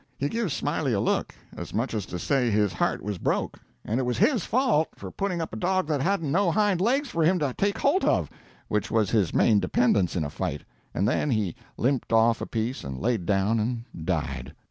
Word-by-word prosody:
He 140 - -1
give 225 -4 -1
Smiley - - -1
a - - +1
look, - - 0 0.2
as - - -7
much 115 +4 -1
as 105 -4 -3
to 90 - -5
say 125 +6 +1
his 105 -2 +2
heart - - -1
was 100 -2 -4
broke, - - -1 0.3
and 115 +4 0
it - - 0
was 125 -1 -1
his 245 - +3
fault, 230 - +2
for - - -8
putting 195 -3 -2
up - - -8
a - - -3
dog 185 +1 0
that 145 -3 +1
hadn't 165 -3 0
no 185 +3 +3
hind 195 0 +2
legs 265 +7 +1
for 165 -6 0
him 180 +4 +4
to 145 -6 -1
take 200 +6 0
holt 345 +8 +2
of, - - +2 0.4
which 105 +1 -1
was 110 -4 +1
his 105 -7 +2
main 105 -3 +4
dependence 100 -6 +2
in 85 - 0
a 75 - -4
fight, - - -3 0.3
and 95 +5 0
then 140 +5 +1
he 105 -8 0 0.2
limped 130 0 0
off 115 0 +4
a - - -3
piece 115 +3 -3
and 65 -1 -5
laid 110 - -1
down 100 +3 +2
and 115 +2 -2 0.2
died. 80 -8 -3
125 Hz, 225 wpm, -26 LUFS, -, 0.4 s, him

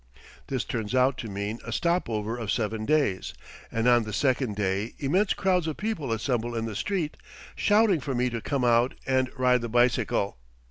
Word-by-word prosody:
This 130 -3 -1
turns 110 0 -3
out 130 +1 +4
to 115 - -5
mean 100 +3 -4
a 115 - -6
stop 170 +4 0
over 110 0 -2
of 115 -5 -3
seven 110 -1 -1
days, 140 -11 +1 0.4
and 115 +1 0
on 120 -1 +6
the 110 -1 -5
second 130 -3 +1
day 100 +2 -1
immense 185 +9 +1
crowds 180 -4 +1
of 155 - -3
people 210 - -3
assemble 120 +1 -1
in 115 0 -1
the 110 -2 -5
street, 175 - -2 0.4
shouting 205 -4 +3
for 135 -1 -3
me 125 +1 +1
to 115 -1 -3
come 140 -1 -1
out 120 +1 +3
and 130 -1 +1
ride 125 -1 +3
the 120 - -4
bicycle. 120 - +1
120 Hz, 190 wpm, -27 LUFS, 110-140 Hz, 0.4 s, on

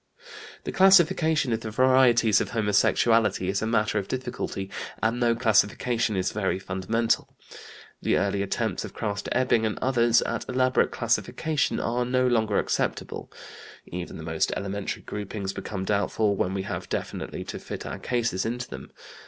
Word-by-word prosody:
The - - -4
classification 170 -7 +4
of 110 - 0
the 110 - -5
varieties 120 -3 +4
of - - -2
homosexuality 110 -1 +2
is 100 +1 0
a 110 - -1
matter 105 -2 +1
of 100 - -6
difficulty, 125 -6 -4 0.3
and 115 +2 0
no 120 -1 +3
classification 115 0 +2
is 95 0 0
very 100 -3 -1
fundamental. 95 +5 -1 0.6
The - - +2
early 100 0 0
attempts 100 0 -2
of - - -9
Krafft 105 -2 -3
Ebing 125 -3 +2
and 110 -2 -1
others 120 -3 +3
at 115 - -4
elaborate 130 0 +2
classification 155 -2 0
are 120 +1 0
no 130 +1 +1
longer 110 -4 +2
acceptable. - - -2 0.5
Even 90 0 -6
the 80 - -8
most 80 0 0
elementary 100 0 -4
groupings 100 -1 -5
become 95 -2 -5
doubtful 100 +1 +1
when 95 0 -1
we 95 - -2
have 100 - -5
definitely - - -4
to - - -6
fit - - -7
our - - -5
cases 115 -6 -1
into 120 +2 -3
them. - - -9
110 Hz, 155 wpm, -26 LUFS, 100-125 Hz, 0.6 s, classification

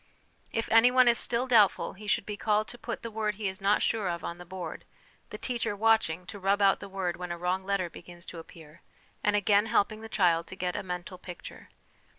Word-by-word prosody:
If 225 - -2
anyone 245 +3 +6
is 235 -1 +5
still 240 +1 +2
doubtful 225 -6 +4
he 210 +2 -11
should 200 - +1
be 210 - -4
called 210 0 +1
to 240 - -9
put 235 - -5
the 230 - -5
word 215 -1 -1
he 210 0 -3
is 190 0 -5
not 200 +2 +3
sure 220 -4 0
of 170 -1 -4
on 170 +1 -5
the 175 - -11
board, 180 -3 -6 0.5
the - - -7
teacher 235 -4 -2
watching 205 -6 +2
to 205 +2 -8
rub 195 +1 +2
out 195 -1 +4
the 200 - -9
word 190 -3 -2
when 180 0 -5
a 170 - -3
wrong 180 +2 -1
letter 195 -2 0
begins 175 +1 -12
to 170 - -8
appear, 160 0 -14 0.4
and 210 0 +2
again 205 +1 +3
helping 215 -1 +1
the 225 - -9
child 170 -5 +2
to - - -9
get 180 -2 -3
a - - -2
mental 180 0 -6
picture. 180 -1 -10
200 Hz, 225 wpm, -29 LUFS, 180-220 Hz, 0.5 s, anyone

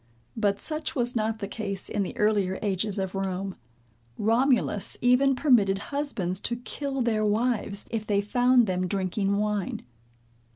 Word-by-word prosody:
But 205 -3 +1
such 310 -1 -4
was 245 -2 0
not 220 0 0
the 200 -2 -4
case 200 -2 -5
in 205 - -1
the 200 +5 -4
earlier 205 -4 +2
ages 200 0 0
of 190 -1 -2
Rome. 195 0 -3 0.6
Romulus 230 -2 +2
even 255 +2 +4
permitted 225 -9 +3 0.2
husbands 200 -11 -1
to 235 - -2
kill 270 +3 -4
their 220 -2 +1
wives, 210 -1 0
if 220 -2 -3
they 205 -1 +2
found 245 +4 +3
them 185 -2 -1
drinking 195 +1 0
wine. 210 -2 -1
210 Hz, 150 wpm, -27 LUFS, 195-245 Hz, 0.6 s, even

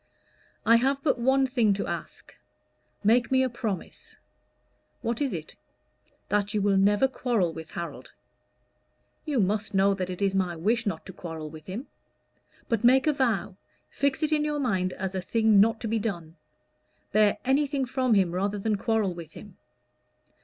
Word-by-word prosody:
"I 230 +1 +6
have 270 +3 0
but 275 -5 +1
one 265 +2 +3
thing 240 -6 +2
to 200 - -3
ask. 170 -1 -7 0.7
Make 235 +3 +3
me 260 0 +4
a 260 - 0
promise." 215 -6 -6 0.9
"What 235 +2 -2
is 275 -3 +1
it?" - - -6 0.7
"That 210 +1 0
you 210 - +1
will 200 -1 +3
never 205 +6 +4
quarrel 235 -10 -1
with 160 0 -9
Harold." 170 0 -7 1.1
"You 290 -5 0
must 205 +1 0
know 195 +1 +4
that 185 -2 -3
it 180 - -5
is 200 -1 +1
my 185 -3 0
wish 220 +7 0
not 165 -5 -3
to 190 - -9
quarrel 160 -4 -7
with 155 -1 -12
him." 210 +9 -5 0.8
"But 230 -1 -1
make 260 +2 +5
a 305 - +3
vow 225 -8 -1 0.3
fix 280 +2 0
it 310 - +1
in 300 -1 +2
your 300 0 -1
mind 190 -9 0
as 190 0 -4
a 190 - -2
thing 220 +2 +3
not 225 +2 +4
to 230 - -3
be 225 +1 0
done. 170 -7 -4 0.8
Bear 210 -1 +4
anything 275 +1 +1
from 255 -2 +1
him 190 -4 +3
rather 195 +3 -1
than 210 +1 0
quarrel 215 -3 0
with 170 -1 -10
him." 205 -4 -12
210 Hz, 175 wpm, -27 LUFS, 190-250 Hz, 1.1 s, I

